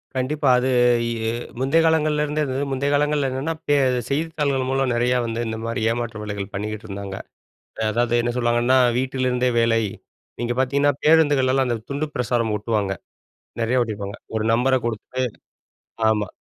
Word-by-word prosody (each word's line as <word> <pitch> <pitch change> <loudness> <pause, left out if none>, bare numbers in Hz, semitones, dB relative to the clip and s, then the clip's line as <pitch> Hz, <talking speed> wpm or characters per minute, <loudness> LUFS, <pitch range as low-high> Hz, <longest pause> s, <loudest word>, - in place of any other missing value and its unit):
கண்டிப்பா, 135 +2 0
அது 125 - 0 0.6
எ - - 0 0.3
முந்தைய 135 +5 +3
காலங்கள்லருந்தே, 150 -1 +1
அது 130 - -3 0.2
முந்தைய 135 +1 0
காலங்கள்ல 145 -1 +2
என்னான்னா, 135 +5 -2
பே 145 - +4 0.3
செய்தித்தாள்கள் 145 -3 0
மூலம் 135 -1 +1
நிறையா 125 +1 +2
வந்து 115 0 -3
இந்த 110 0 -3
மாரி 115 0 -2
ஏமாற்று 115 -2 -4
வேலைகள் 100 -2 -5
பண்ணிக்கிட்டு 105 +2 -4
இருந்தாங்க. 100 -1 -6 0.8
அதாவது, 120 +1 +1
என்ன 120 0 0
சொல்லுவாங்கன்னா, 120 +1 +2 0.2
“வீட்டிலிருந்தே 130 -1 0
வேலை!” 115 -1 +3 0.6
நீங்க 120 0 -1
பாத்தீங்கன்னா, 140 +2 +2
பேருந்துகள்லலாம் 145 -4 +4
அந்த 120 - 0
துண்டு 145 +2 -1
பிரசாரம் 120 -2 0
ஓட்டுவாங்க, 105 -2 -1 0.7
நிறையா 115 +3 +1
ஓட்டிருப்பாங்க, 100 -3 -5 0.2
ஒரு 110 - -1
நம்பரை 130 +3 +3
குடுத்துட்டு. 120 +3 -3 0.9
ஆமா, 105 -2 +1
125 Hz, 140 wpm, -22 LUFS, 115-140 Hz, 0.9 s, பே